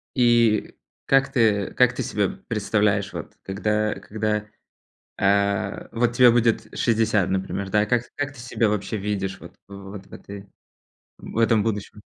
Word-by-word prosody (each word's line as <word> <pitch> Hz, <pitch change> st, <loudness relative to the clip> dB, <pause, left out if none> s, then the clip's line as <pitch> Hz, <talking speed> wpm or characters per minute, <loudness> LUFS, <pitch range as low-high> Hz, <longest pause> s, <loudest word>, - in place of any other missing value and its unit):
И 120 Hz, -4 st, +3 dB, 0.3 s
как 135 Hz, 0 st, +3 dB
ты 110 Hz, -6 st, +2 dB
как 125 Hz, -1 st, +4 dB
ты 130 Hz, -, -3 dB
себя 105 Hz, -4 st, 0 dB, 0.2 s
представляешь, 105 Hz, -2 st, 0 dB
вот -, -, -7 dB
когда 105 Hz, +2 st, -1 dB
когда, 105 Hz, +1 st, -2 dB, 0.7 s
а, 100 Hz, 0 st, +1 dB
вот 120 Hz, +1 st, +1 dB
тебе 125 Hz, 0 st, +7 dB
будет 115 Hz, -1 st, +2 dB
60, 110 Hz, -5 st, +2 dB
например, 95 Hz, +1 st, -2 dB
да? 105 Hz, +2 st, +2 dB
Как 120 Hz, +2 st, +1 dB
как 145 Hz, 0 st, -3 dB
ты 140 Hz, -, -14 dB
себя 120 Hz, -2 st, 0 dB
вообще 105 Hz, +1 st, -2 dB
видишь 100 Hz, -1 st, -3 dB
вот -, -, -13 dB
вот 100 Hz, 0 st, -10 dB
в -, -, -18 dB
этой, 100 Hz, 0 st, -10 dB, 0.7 s
в -, -, -9 dB
этом 115 Hz, -2 st, +3 dB
будущем? 105 Hz, -1 st, -4 dB
105 Hz, 150 wpm, -23 LUFS, 100-115 Hz, 0.7 s, тебе